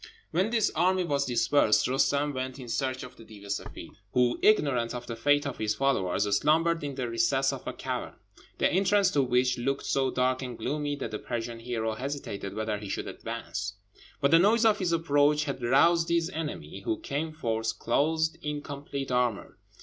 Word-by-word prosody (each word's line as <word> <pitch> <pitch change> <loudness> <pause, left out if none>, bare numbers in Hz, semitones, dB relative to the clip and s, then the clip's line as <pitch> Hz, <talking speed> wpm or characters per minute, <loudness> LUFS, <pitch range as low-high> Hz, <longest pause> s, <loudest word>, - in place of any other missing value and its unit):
When 190 +5 +1
this 225 -2 +2
army 185 +1 +2
was 140 -4 0
dispersed, 125 -2 +3
Roostem 140 +2 +1
went 130 0 -4
in 130 -3 -9
search 130 +1 -2
of 125 0 -11
the - - -12
Deev 105 -2 -13
e 100 - -11
Seffeed, 100 - -5 0.2
who, 125 -1 +2
ignorant 135 - +3
of 120 0 -6
the 115 - -5
fate 145 +5 +2
of 140 -3 -4
his 105 -1 0
followers, 105 -8 +1 0.2
slumbered 165 +2 +2
in 140 -2 -4
the 130 -2 -2
recess 120 +4 +1
of - - -8
a - - -3
cavern, - - -4 0.4
the - - +3
entrance 195 +1 +3
to 145 - +2
which 125 0 +1
looked 135 +3 -1
so 135 -1 +1
dark 130 0 +1
and 125 -3 -6
gloomy 145 0 -2
that 145 - -5
the 105 - -4
Persian 120 -1 -4
hero 115 -2 -2
hesitated 110 -6 -5
whether 110 -1 -2
he 105 -2 -8
should - - -3
advance; 95 +4 -5 0.5
but 140 0 +2
the 165 - +7
noise 220 +5 +4
of 215 -2 +4
his 180 -3 0
approach 150 -2 +3
had 140 -3 -4
roused 165 +8 +4
his 170 +1 +1
enemy, 145 - -5
who 110 - -1
came 155 +3 -3
forth, 115 -6 -2
clothed 160 +7 +1
in 150 -1 -4
complete 140 -2 -5
armour. 125 -4 -1
135 Hz, 195 wpm, -28 LUFS, 120-150 Hz, 0.5 s, the